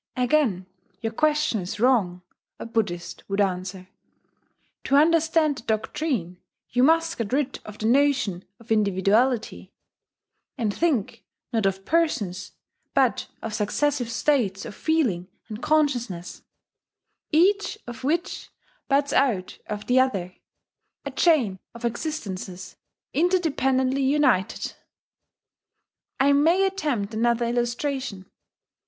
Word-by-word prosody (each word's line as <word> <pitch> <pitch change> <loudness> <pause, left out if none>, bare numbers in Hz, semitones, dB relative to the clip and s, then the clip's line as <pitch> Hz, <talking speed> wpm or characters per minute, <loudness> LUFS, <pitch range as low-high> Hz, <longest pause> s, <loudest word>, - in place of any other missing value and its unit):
"Again 250 -7 +1 0.4
your 225 0 -3
question 300 -5 +1
is 180 +3 -6
wrong," 205 -8 +2 0.3
a - - -7
Buddhist 210 -7 -3
would 195 +1 -1
answer: 185 -1 -1 1.0
"to 275 - +2
understand 320 -1 +3
the - - -10
doctrine 220 - -2 0.3
you 245 - +2
must 330 +3 +3
get 230 -2 -2
rid 270 0 0
of 210 0 -9
the 220 - -4
notion 255 -7 +2 0.2
of 230 0 -14
individuality, 215 +4 +1 0.9
and 220 -5 -1
think, 250 - -1 0.3
not 220 -4 +2
of 195 0 -3
persons, 215 - 0 0.4
but - - +2 0.2
of 225 - -4
successive 245 +4 0
states 230 -6 0
of - - -7
feeling 240 - 0 0.2
and 215 +1 -7
consciousness, 255 - 0 0.9
each 390 +6 +3
of 240 +2 -9
which 320 +6 -2 0.4
buds 280 +1 +2
out 215 -10 +1
of 210 0 -5
the 250 +1 +3
other, 195 -9 0 0.7
a - - -4
chain 250 - +2 0.2
of 235 +1 -6
existences 205 - -4 0.4
interdependently 275 -6 +1
united."... 265 -9 +1 1.5
I 280 +1 +5
may 330 +7 +4
attempt 295 - -2
another 235 +1 +1
illustration. 240 -3 -2
245 Hz, 110 wpm, -25 LUFS, 200-295 Hz, 1.5 s, I